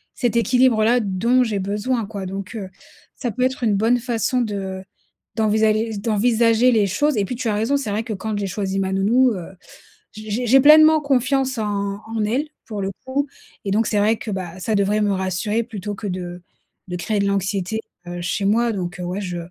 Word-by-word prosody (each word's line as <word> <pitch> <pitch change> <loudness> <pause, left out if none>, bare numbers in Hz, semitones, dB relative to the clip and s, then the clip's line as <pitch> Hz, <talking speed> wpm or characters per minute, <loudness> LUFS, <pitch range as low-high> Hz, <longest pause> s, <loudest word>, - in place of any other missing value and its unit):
cet 240 -2 0
équilibre-là, 245 -1 +3
dont 230 +6 +2
j'ai 210 -4 -1
besoin, 210 +5 -1
quoi, 200 -2 -6
donc, 195 +3 -6
heu, 200 -4 -5 0.5
ça 240 -4 -3
peut 250 +5 -2
être 260 0 -1
une 215 -3 +2
bonne 230 +5 +2
façon 245 +1 0
de 195 -4 -4 0.5
d'envisager 220 0 +1
d'envisager 230 +3 +3
les 210 -3 +3
choses 295 +9 +1
et 205 - +2
puis, 250 - -4
tu 250 -2 -3
as - - +1
raison, 225 +7 +1
c'est 275 -6 -4
vrai 210 +2 -1
que 225 - -7
quand 210 +1 -3
j'ai 200 -1 -2
choisi 195 0 -2
ma 190 -1 -1
nounou, 235 +6 +3
heu, 180 -4 -6 0.7
j'ai 215 0 -9
j'ai 240 +3 -1
j'ai 270 +4 +6
pleinement 310 +1 +7
confiance 265 -1 +1
en 215 - -1 0.4
en 225 -1 -2
elle, 260 +8 0 0.2
pour 210 -4 -5
le 195 - -2
coup 275 +2 -1 0.4
et 195 - -1
donc 220 +2 +2
c'est 210 - +1
vrai 215 +2 +3
que, 215 - -6
bah 185 -2 -5
ça 220 +4 -2
devrait 205 +1 +2
me 205 -1 +2
rassurer 190 +4 -1
plutôt 205 -3 -6
que 205 - -6
de 180 -1 -5 0.5
de 180 - -3
créer 210 +3 -1
de 200 - +1
l'anxiété, 200 +2 -1 0.3
heu, 175 0 -5
chez 195 +3 -2
moi 230 +3 +2
donc, 180 -2 -4
heu, - - -4
ouais, 180 +3 -3
je 180 -2 -4
215 Hz, 210 wpm, -21 LUFS, 195-240 Hz, 0.7 s, pleinement